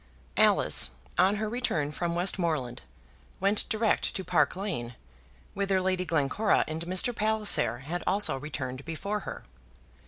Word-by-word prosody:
Alice, - - +4 0.3
on 190 +3 +4
her 215 +1 -2
return 210 - -1
from 170 +2 -2
Westmoreland, 165 -8 -1 0.6
went 200 +2 +1
direct 220 0 0
to 190 - -3
Park - - +2
Lane, 160 - -4 0.6
whither 195 -1 +1
Lady 185 0 0
Glencora 160 +6 +1
and 155 +1 -4
Mr. 185 +7 +1
Palliser 210 - +2
had 175 +4 -4
also 200 +2 +3
returned 135 -2 -5
before 200 +7 -3
her. - - -8
185 Hz, 130 wpm, -28 LUFS, 150-205 Hz, 0.6 s, Alice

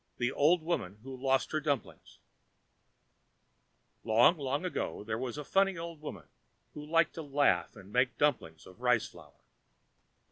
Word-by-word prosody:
The 120 +1 0
Old 155 +5 +3
Woman 105 - -2
who 135 0 -7
Lost 130 0 0
her 155 - 0
Dumplings 145 -5 -4 1.9
Long, 115 +10 +5
long 140 +2 -2
ago 105 - -3
there 110 +1 -3
was 130 +1 -4
a 150 - -4
funny 195 +4 +2
old 165 -2 -7
woman 155 - -8 0.5
who 150 - -8
liked 165 +2 +2
to 165 - -6
laugh 145 -3 +1
and 100 -3 -13
to - - -16
make 125 +1 +2
dumplings 80 - 0
of 95 +6 -16
rice 125 -3 +3
flour. - - -17
140 Hz, 155 wpm, -31 LUFS, 120-155 Hz, 1.9 s, Long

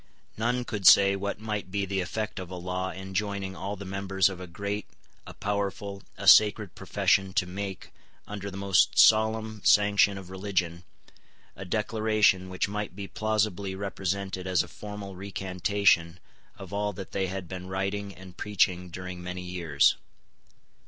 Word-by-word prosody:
None 120 +3 -1
could 100 -6 0
say 100 0 +8
what 100 +1 -3
might 105 -3 -4
be 100 +1 -1
the 95 0 -2
effect 105 +4 -3
of 90 -2 -7
a 95 - -6
law 90 +1 -3
enjoining 95 0 -4
all 100 +2 -4
the 100 0 -9
members 95 0 +1
of 95 -2 -8
a 90 - -7
great, 100 +4 -4 0.4
a - - -9
powerful, 100 -1 -3 0.2
a - - -5
sacred 105 -2 +6
profession 95 -1 +1
to 100 -3 +2
make, 95 +1 -6 0.3
under 100 -1 -6
the 95 - -8
most 100 -2 +3
solemn 110 0 +4
sanction 100 -1 +4
of 95 -1 -10
religion, 95 -3 -2 0.7
a 95 - -8
declaration 105 -2 +2
which 95 +1 -1
might 105 -3 -4
be 100 0 -6
plausibly 105 -3 -1
represented 95 -1 -3
as 95 -1 +2
a - - -11
formal 105 -2 -8
recantation 95 -2 +1 0.4
of - - -10
all 105 0 -1
that 95 +1 -8
they 95 -1 -1
had 95 -1 -5
been 90 +1 -7
writing 100 +2 -3
and 95 -1 -13
preaching 90 -3 +1
during 90 0 -7
many 90 +1 -6
years. 85 -5 +2
95 Hz, 160 wpm, -28 LUFS, 95-105 Hz, 0.7 s, say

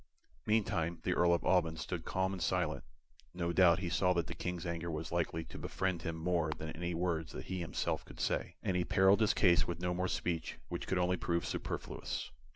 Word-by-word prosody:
Meantime 85 -6 +1
the 90 - +1
Earl 85 -1 +4
of 85 - +2
Alban 85 -3 +3
stood 80 +1 -4
calm 95 +1 0
and 95 - -5
silent. 85 -2 0 0.5
No 85 -1 -1
doubt 85 -3 +6
he 95 -2 -2
saw 90 +2 +3
that 85 -2 0
the - - -6
King's 90 -1 -4
anger 85 0 -3
was 80 0 -4
likely 85 -1 0
to - - -9
befriend 95 -3 -1
him 80 0 -3
more 85 -1 0
than 80 0 -5
any 85 +1 -3
words 85 -2 -1
that - - -6
he 95 -1 -3
himself 85 - -1
could - - -13
say, - - -1
and 95 - 0
he 90 - +2
perilled 95 +4 +4
his 110 - +4
case 85 -6 +4
with 85 - -3
no 90 0 0
more 90 +1 0
speech 85 -3 -2
which - - -4
could 95 - +1
only 90 0 +2
prove 85 0 0
superfluous. - - -4
85 Hz, 215 wpm, -34 LUFS, 85-90 Hz, 0.5 s, doubt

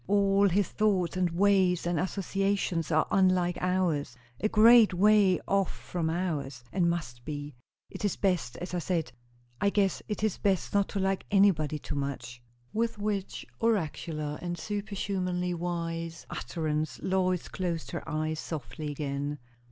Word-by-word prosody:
All 200 0 +4
his 190 +1 +2
thoughts 190 -5 +1
and 185 -1 +1
ways 185 0 +3
and 175 -2 0
associations 195 -2 -1
are 155 0 +3
unlike 185 -2 +3
ours 175 -8 0 0.2
a 215 - +1
great 225 -2 +7
way 200 -1 +5
off 195 -2 +2
from 170 -3 -3
ours; 150 -7 -2
and 175 -3 +2
must 120 -9 -4
be. 145 0 -5 0.3
It - - -9
is 205 - +1
best 180 -11 0
as 180 0 -6
I 180 - 0
said. 170 -2 -1 0.5
I 200 - +4
guess 200 -2 +1
it 210 0 -3
is 215 -3 0
best 195 -3 0
not 200 -1 +3
to 200 - -2
like 190 0 -1
anybody 180 -7 +3
too 150 - -6
much." 130 -4 -4 0.3
With 230 0 0
which 205 -2 -3
oracular 155 -8 -1
and 175 -1 -3
superhumanly 190 -3 -2
wise 165 -1 -4
utterance 155 -3 -2
Lois 185 -2 +1
closed 170 -3 -3
her 170 - -3
eyes 155 0 -1
softly 150 -1 -5
again. 145 0 -3
180 Hz, 150 wpm, -29 LUFS, 155-195 Hz, 0.5 s, great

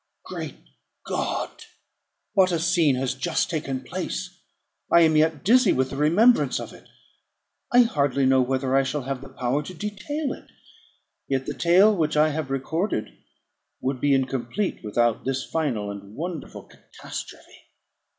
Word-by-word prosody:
Great - - -6 0.5
God! - - -2 0.8
what 185 -2 +4
a 170 - +1
scene 165 -4 +2
has 125 0 -1
just 160 +7 -1
taken 135 -5 -3
place! 185 0 -5 0.5
I 170 - +7
am 160 -1 +4
yet 155 -1 +2
dizzy 235 -1 +5
with 130 0 0
the - - -5
remembrance 180 - +4
of - - -8
it. - - -17 0.8
I 245 - +7
hardly 140 - +1
know 130 0 +4
whether 130 +1 0
I 135 - +5
shall 135 +1 -2
have 135 0 -4
the 135 - -10
power 130 +2 -1
to 180 +5 -9
detail 210 - -3
it; - - -13 0.8
yet 135 -1 -1
the - - -3
tale 190 +5 +5
which 155 -4 0
I 155 +1 +5
have 155 -2 -3
recorded 135 - -2 0.6
would 130 -1 -2
be 145 -1 +4
incomplete 135 - -2
without 115 +1 +1
this 135 0 -2
final 120 -11 -2
and 100 +1 -10
wonderful 170 -1 -6
catastrophe. - - -10
150 Hz, 150 wpm, -24 LUFS, 130-175 Hz, 0.8 s, I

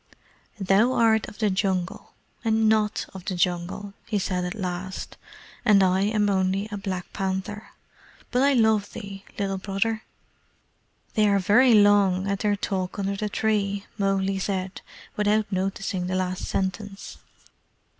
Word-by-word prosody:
"Thou 195 +6 +3
art 220 -2 +3
of - - -11
the 215 -3 +1
Jungle 185 -2 -2 0.3
and 220 -1 +2
NOT 215 -1 +2
of 190 -2 -9
the 190 - -2
Jungle," 180 +3 -1
he 210 - 0
said 185 -2 -1
at 180 +4 -4
last. 185 -2 -5 0.5
"And 210 -4 +5
I 185 0 +3
am 210 0 +1
only 195 +1 +1
a - - -3
black 190 -2 -5
panther. 195 +2 -3 0.6
But 250 - +2
I 280 +1 +4
love 220 -4 +2
thee, 200 -3 -8
Little 195 -1 -1
Brother." 210 +3 -1 1.1
"They 215 -1 +3
are 200 - +4
very 225 +6 +5
long 200 -2 +4
at 200 0 -1
their 205 -1 +1
talk 190 -2 -3
under 200 0 -1
the 210 +1 -2
tree," 200 -2 0
Mowgli 195 -1 +1
said, 190 -1 -3 0.3
without 210 0 +1
noticing 190 -1 -2
the 185 - -1
last 185 0 -2
sentence. 195 +1 -4
200 Hz, 145 wpm, -25 LUFS, 190-210 Hz, 1.1 s, And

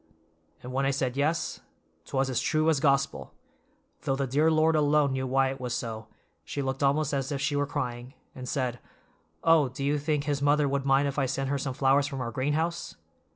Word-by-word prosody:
'" - - -36
"And 125 +1 -7
when 135 +1 0
I - - +3
said 130 -2 -1
yes, 155 +3 0 0.5
'twas 135 0 0
as 130 -3 -1
true 155 0 +2
as 150 - +1
Gospel, 140 -1 0 0.7
though 135 - 0
the 135 0 -1
dear 145 +5 +2
Lord 160 0 +3
alone 150 -2 +3
knew 130 0 -2
why 135 +1 +2
it 135 -1 -8
was 125 -1 -2
so, 110 -2 -5 0.4
she 140 - -4
looked 130 +1 -3
almost 145 +1 +2
as 135 0 -1
if 140 - -2
she 145 +2 0
were 145 0 +1
crying, 125 -3 -4 0.2
and 125 -1 -7
said, 125 -4 -2 0.6
'Oh, 160 -5 +5
do 130 +2 -6
you 145 +1 +1
think 150 0 0
his 145 -2 -1
mother 145 0 +3
would 140 0 -1
mind 135 +1 +4
if 140 +1 -2
I 135 - +1
sent 135 +1 -2
her 140 - 0
some 135 -1 -3
flowers 140 +1 +3
from 135 -1 -5
our 120 -2 -3
greenhouse? 150 +7 -1
140 Hz, 215 wpm, -28 LUFS, 130-145 Hz, 0.7 s, Oh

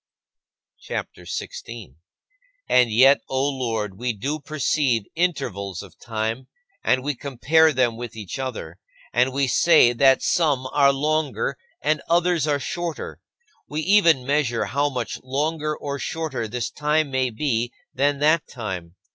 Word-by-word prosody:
CHAPTER - - -6
XVI - - -5
21. 115 - -10 0.7
And 125 -2 +4
yet, 135 +5 +6
O 135 +1 +1
Lord, 115 -7 -3
we 125 0 -1
do 140 +9 -3
perceive 140 -5 0
intervals 100 - -2
of 95 - -16
time, 115 +2 -3 0.4
and 130 0 +2
we 145 +1 -1
compare 145 +5 +2
them 125 -4 +1
with 120 -2 -7
each 110 +4 -6
other, 110 -10 -5 0.3
and 125 +3 +3
we 140 +1 +1
say 130 -1 +5
that 135 +2 +4
some 145 -6 +1
are 140 -1 +5
longer 140 -3 -1 0.3
and 155 +1 +1
others 170 -2 +2
are 145 -1 +1
shorter. 170 +4 -5 0.5
We 150 +1 -2
even 170 -8 +4
measure 135 -4 +1
how 145 +4 0
much 125 -4 -4
longer 150 +3 -2
or 140 -1 -5
shorter 135 -9 -3
this 120 +2 -3
time 150 0 0
may 130 -1 +1
be 120 -1 -1 0.2
than 140 +2 +1
that 155 +2 +3
time. 95 -8 -6
135 Hz, 145 wpm, -23 LUFS, 120-150 Hz, 0.7 s, yet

